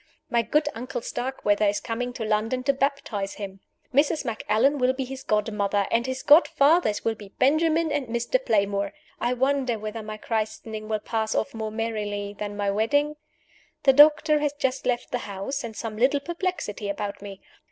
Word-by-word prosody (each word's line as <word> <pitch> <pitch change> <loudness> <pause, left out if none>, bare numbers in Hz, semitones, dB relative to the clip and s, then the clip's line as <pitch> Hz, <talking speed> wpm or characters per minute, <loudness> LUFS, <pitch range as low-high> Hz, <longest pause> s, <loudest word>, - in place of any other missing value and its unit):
My 235 - +3
good 295 +7 +1
Uncle 245 +2 -5
Starkweather 215 -5 0
is 205 0 +1
coming 245 +1 -3
to 225 - -4
London 220 +4 0
to 275 +1 +3
baptize 270 -8 -2
him. 195 -2 -7 0.3
Mrs. 290 +2 +2
Macallan 235 +4 +1
will 255 0 +3
be 265 0 -3
his 265 +1 -7
godmother; 210 -2 0
and 235 +2 +2
his 260 0 -4
godfathers 295 -4 +4
will 225 - +2
be 210 -2 -12
Benjamin 315 +3 +3
and 290 -3 -1
Mr. 235 - 0
Playmore. 200 - +1 0.3
I 240 +1 +1
wonder 260 -2 +1
whether 215 +1 -5
my 215 0 -7
christening 220 0 -3
will 215 - +1
pass 220 +1 -2
off - - -1
more 220 -1 -3
merrily 210 -2 -3
than 205 -1 -4
my 200 -1 0
wedding? 285 +9 +1 0.7
The 270 - +6
doctor 300 +2 +6
has 295 -1 0
just 265 -3 -2
left 245 -1 -1
the 245 - -1
house, 205 +7 -4
in 225 -2 -6
some 220 -1 -5
little 270 +5 +3
perplexity 335 - -3
about 200 0 -4
me. 200 -1 -8
230 Hz, 175 wpm, -25 LUFS, 210-275 Hz, 0.7 s, The